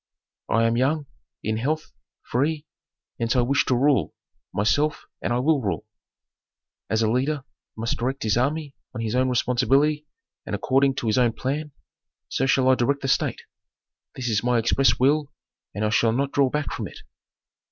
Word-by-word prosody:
I 115 +1 +3
am 115 0 +2
young, 145 +4 +1 0.4
in 110 +1 -1
health, 155 +7 -2 0.3
free, 150 +5 -1 0.5
hence 115 +1 0
I 125 - +4
wish 135 +4 +2
to 130 - +2
rule, 140 +2 +2 0.4
myself, 145 +9 +1 0.2
and - - -2
will 155 -3 +3
rule. 95 -8 -2 1.0
As 110 +1 +1
a 110 - +2
leader 135 +4 0 0.3
must 115 +1 -2
direct 130 +3 -2
his 110 -2 +1
army 140 +4 -1 0.2
on 115 - -3
his 110 -1 -2
own 130 +1 +2
responsibility 135 +5 +2 0.4
and - - -3
according 135 +1 +2
to 140 - -4
his 110 +2 +2
own 120 -2 +3
plan, 145 +5 -3 0.6
so 135 - 0
shall 135 -1 +3
I - - +7
direct 135 +3 +1
the - - -1
state. - - 0 0.7
This 130 -2 -4
is 110 -2 +1
my 125 0 +2
express 115 +4 +3
will 145 +3 +2 0.4
and 105 +1 -1
I - - +1
shall 115 0 +3
not 140 +3 0
draw 140 -2 +3
back 150 +1 -2
from - - -4
it. - - -12
130 Hz, 175 wpm, -24 LUFS, 115-140 Hz, 1.0 s, I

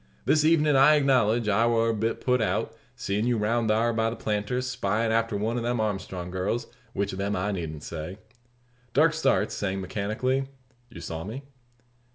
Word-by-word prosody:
This 155 -1 +3
evenin', 155 -2 +4
I 135 +3 +7
acknowledge, 120 -6 +2
I 110 +3 +3
war 115 -1 +2
a - - +1
bit 110 +1 -2
put 125 -1 +2
out 110 - -1 0.2
seein' 105 +4 -1
you 120 -1 +2
round 110 +2 0
thar 115 +2 +2
by 115 0 +1
the 115 - -5
planter's, 110 +3 -2
spyin' 115 -2 0
after 115 -2 +1
one 110 +4 -1
of 120 - -2
them 120 0 -1
Armstrong 95 -4 -3
girls; 95 +6 -1 0.3
which 100 0 -1
of 95 - -6
them 100 +1 -1
I 100 +3 -1
needn't 80 -5 -5
say." 85 +3 -6 0.8
Darke 160 +3 +5
starts, 150 -4 +1
saying 95 -1 -2
mechanically, 110 +8 -1 0.4
"You 120 - -10
saw 80 0 -5
me?" 115 +9 -7
115 Hz, 185 wpm, -26 LUFS, 100-125 Hz, 0.8 s, I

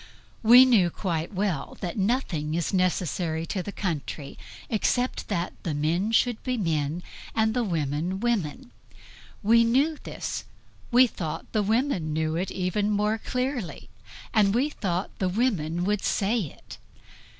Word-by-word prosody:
We 245 +3 +9
knew 215 -9 +4
quite 170 -2 -3
well 190 -7 -2
that 175 -3 -4
nothing 190 - 0
is 170 +2 -1
necessary 175 -3 0
to 190 +2 -2
the 200 - -6
country 155 -7 -4 0.3
except 245 +3 0
that 170 +1 -2
the 160 -4 -2
men 170 +8 0
should 235 0 +2
be 255 -1 -1
men 160 -3 -1 0.3
and 220 0 +2
the 245 - +1
women 165 0 -1
women. 240 - -1 0.7
We 230 +3 +6
knew 275 +7 +2
this; - - -4 0.5
we 250 +1 +7
thought 165 -8 -4
the 215 - +1
women 210 - 0
knew 155 0 0
it 180 +3 -1
even 190 +3 -1
more 210 +1 +1
clearly; 250 - -3 0.4
and 205 -1 +4
we 275 +5 +2
thought 185 -7 -2
the 185 - +1
women 180 -6 0
would 205 +1 0
say 215 +4 +1
it. 140 - -12
195 Hz, 145 wpm, -26 LUFS, 165-230 Hz, 0.7 s, We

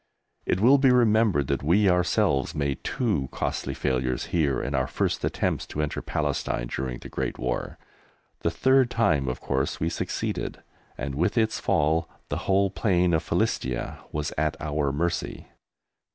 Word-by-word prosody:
It 90 - +1
will 130 +7 +6
be 135 -1 +5
remembered 110 - +4
that 70 - 0
we 90 +8 +3
ourselves 85 -6 +2
made 70 -2 -2
two 100 - -1
costly 70 - -3
failures 65 -2 -1
here 75 -6 +2
in 70 - -3
our 65 -2 +1
first - - -1
attempts - - -1
to 75 - -3
enter 75 - -3
Palestine - - -2
during 65 -2 -3
the - - -10
Great - - -3
War. 60 0 -3 0.6
The - - 0
third 130 +9 +3
time 80 - +2
of 65 - -2
course - - -1
we 80 - 0
succeeded, - - -3 0.3
and 70 +2 -4
with 85 - 0
its 110 -1 +2
fall 80 +2 +1 0.2
the - - -1
whole 100 0 +3
plain 90 -4 +2
of 80 - +3
Philistia 65 -1 -1
was 75 -1 -3
at 80 0 0
our 75 -2 -1
mercy. 85 +4 -2
80 Hz, 160 wpm, -26 LUFS, 70-100 Hz, 0.6 s, will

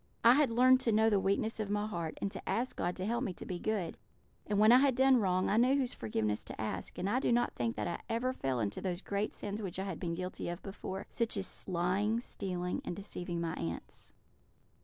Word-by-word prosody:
"I 235 - +9
had 285 -1 +4
learned 255 +2 +6
to 240 - +1
know 220 +1 +4
the 205 - +4
weakness 200 +4 0
of 210 -2 -2
my 205 0 0
heart, 170 -7 -4
and 200 - -2
to - - -7
ask 245 +3 0
God 175 +1 -1
to 185 - -3
help 235 +4 0
me 195 - -2
to - - -8
be 180 -2 -4
good; 200 -6 -2 0.5
and 205 - 0
when 215 +2 +7
I 250 - +8
had 270 -2 +3
done 265 0 +5
wrong, 185 -3 +1
I 210 - +2
knew 255 +4 +5
whose 265 -3 0
forgiveness 105 -1 -1
to - - -8
ask; 110 - -4
and 190 - -1
I 235 +6 +2
do - - +1
not 240 0 +2
think 115 -2 -1
that - - -2
I 170 - -3
ever 240 +3 0
fell 135 - -1
into 105 -2 -2
those 185 -1 -3
great 200 +1 -2
sins 205 +1 -4
which 185 -4 -4
I 190 - -2
had 190 -4 -4
been 170 -2 -2
guilty 180 0 -4
of 175 +1 -6
before 195 0 -6
such 230 -3 -1
as 195 -1 -3
lying, 190 +5 +1
stealing, 180 -6 -3
and - - -4
deceiving 180 -3 -5
my 165 -1 -2
aunts." 85 0 -6
200 Hz, 245 wpm, -33 LUFS, 175-230 Hz, 0.5 s, I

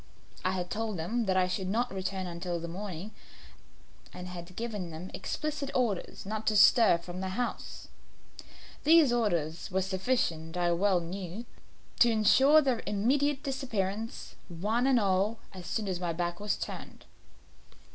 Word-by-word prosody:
I 185 - +1
had 180 -1 -3
told 220 -2 -2
them 220 +8 -1
that 190 0 +2
I 185 -1 +3
should 185 +1 -2
not 235 +2 0
return 190 0 -3
until 175 0 -3
the 170 - -5
morning, 185 +2 -6 1.0
and 180 - -8
had 180 0 -8
given 210 -6 -4
them 165 +3 -8
explicit 300 -2 -3
orders 225 -9 -1
not 215 +2 -4
to 215 - +3
stir 210 -2 +7
from 175 +2 -7
the 190 - -2
house. 240 +6 -4 1.0
These 310 -4 +6
orders 170 -9 0
were 190 0 0
sufficient, 185 -4 -1
I 175 -1 +2
well 180 +1 +2
knew, 185 +5 -6 0.5
to 240 - +7
insure 265 +8 +5
their 255 -4 +1
immediate 270 +7 +1
disappearance, 225 -6 -3 0.2
one 215 +9 0
and 260 -3 +5
all, 200 +2 +1 0.2
as 180 -2 -9
soon 215 -3 -2
as 185 -2 -2
my 175 -2 -1
back 175 +1 -2
was 205 -1 0
turned. - - -7
195 Hz, 155 wpm, -30 LUFS, 180-230 Hz, 1.0 s, stir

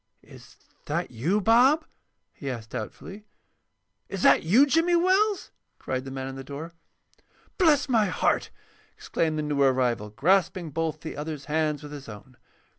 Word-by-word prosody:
"Is - - -16 0.3
that - - -2
you, 155 - 0
Bob?" 250 +9 +4 0.5
he 140 - -6
asked, 115 -3 -6
doubtfully. 195 - -8 0.8
"Is 195 - -4
that - - +6
you, 215 - +5
Jimmy 330 +5 +2
Wells?" 380 +4 +2 0.3
cried 130 0 -4
the - - -6
man 135 0 -5
in 135 - -7
the 135 - -7
door. 145 +5 -7 0.9
"Bless 305 -6 +4
my 225 -5 +3
heart!" 180 - 0 0.5
exclaimed 160 -2 -1
the 155 - -1
new 145 -1 -1
arrival, 125 -5 +1
grasping 170 - +1
both 160 0 -3
the 160 - -7
other's 150 -2 -6
hands 155 0 -1
with 145 - -9
his 140 -4 -9
own. 115 +4 -12
155 Hz, 155 wpm, -26 LUFS, 135-215 Hz, 0.9 s, that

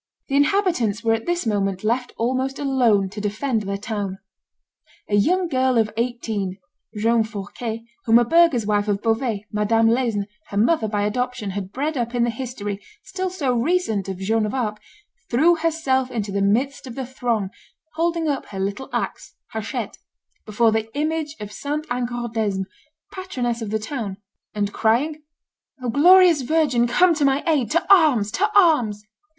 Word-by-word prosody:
The 275 - 0
inhabitants 285 - +2
were 225 -1 +3
at 225 +5 -3
this 345 -4 0
moment 195 -3 -1
left 240 +3 0
almost 260 +3 -1
alone 245 -8 +2
to 210 +2 -7
defend 215 +3 -1
their 200 -1 -3
town. 200 -2 -4 0.9
A - - -6
young 355 - +2
girl 260 -4 +1
of 215 -2 +1
eighteen, 225 -5 -2 0.4
Joan 230 +2 +3
Fourquet, 220 +2 -6 0.2
whom 230 0 +6
a 240 - +4
burgher's 330 -5 +4
wife 205 0 +1
of 205 -1 -1
Beauvais, 225 -2 0
Madame 225 +1 +2
Laisne, 230 -4 +1 0.2
her 200 - -5
mother 230 +2 +3
by 205 -1 -1
adoption, 250 0 -2
had 190 -1 -5
bred 290 +5 -2
up 240 0 -2
in 240 - +2
the 235 - +1
history, 220 -5 -5 0.2
still 375 0 -3
so 290 -9 -1
recent, 235 - 0
of 190 - -4
Joan 215 +3 0
of 210 - -4
Arc, 215 -5 -2 0.5
threw 310 +8 +4
herself 315 -6 0
into 215 -5 -3
the 200 0 -1
midst 255 +8 0
of 240 - -8
the 265 - -4
throng, 235 -6 -2 0.4
holding 335 0 0
up 285 -2 -2
her 195 - -7
little 200 +7 -3
axe - - -4 0.2
(hachette) 220 -1 -4 0.5
before 220 +2 +3
the 220 0 -1
image 310 0 -1
of 210 -1 -7
St. 295 +6 -4
Angadresme, 235 -5 -2 0.5
patroness 250 -11 -3
of 220 - -4
the 220 - 0
town, 220 -3 -5 0.4
and 205 -1 -1
crying, 280 +8 +1 0.6
"O 245 - -1
glorious 345 +3 +6
virgin, 260 -3 +2
come 360 +8 +4
to 305 -2 -1
my 275 +1 +2
aid; 290 - +1
to 335 +6 +1
arms! 275 - +4
to 415 +3 +1
arms!" 245 - +3
235 Hz, 165 wpm, -22 LUFS, 210-285 Hz, 0.9 s, whom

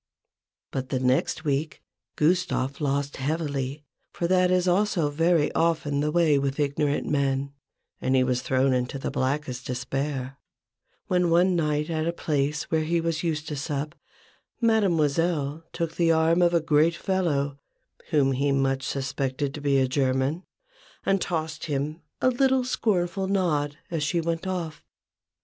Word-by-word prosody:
But 130 -1 -4
the 130 - 0
next 130 +5 +1
week 145 +1 -1 0.3
Gustave 155 -4 +1
lost 140 0 -1
heavily, 145 -1 -2 0.3
for 170 - -3
that 180 +1 +3
is 185 0 +2
also 180 -4 +2
very 165 0 +2
often 160 -3 +1
the 150 +1 0
way 160 -4 +3
with 140 +1 -2
ignorant 145 0 0
men: 140 -1 0 0.5
and 130 - +1
he 130 - +4
was 125 -1 0
thrown 130 0 +2
into 125 +2 -1
the 135 - -4
blackest 130 -1 -2
despair, 135 +1 -3 0.7
when 180 -1 +2
one 175 +2 +4
night 150 -1 0
at 160 0 -1
a 170 - 0
place 150 -1 -1
where 160 -1 +2
he 170 +2 +1
was 165 -1 -1
used 155 -3 -2
to 150 - -3
sup, 145 +1 -3 0.7
Mademoiselle 165 - +1
took 165 -1 -3
the 170 -1 +3
arm 165 +2 +3
of 175 0 +4
a 170 - +3
great 160 +2 +3
fellow, 145 -8 -1 0.5
whom 145 -4 +3
he 140 +2 +1
much 135 -1 +1
suspected 135 0 -2
to 150 - -7
be 140 -1 +2
a 130 -1 +3
German, 135 +5 0 0.6
and 195 -1 +2
tossed 160 -2 -3
him 150 +2 -2 0.2
a 255 - +4
little 265 +1 +2
scornful 190 -6 0
nod, 150 -7 0
as 165 -3 -1
she 170 +4 0
went 165 +2 -2
off. 175 -4 -4
150 Hz, 155 wpm, -26 LUFS, 140-170 Hz, 0.7 s, he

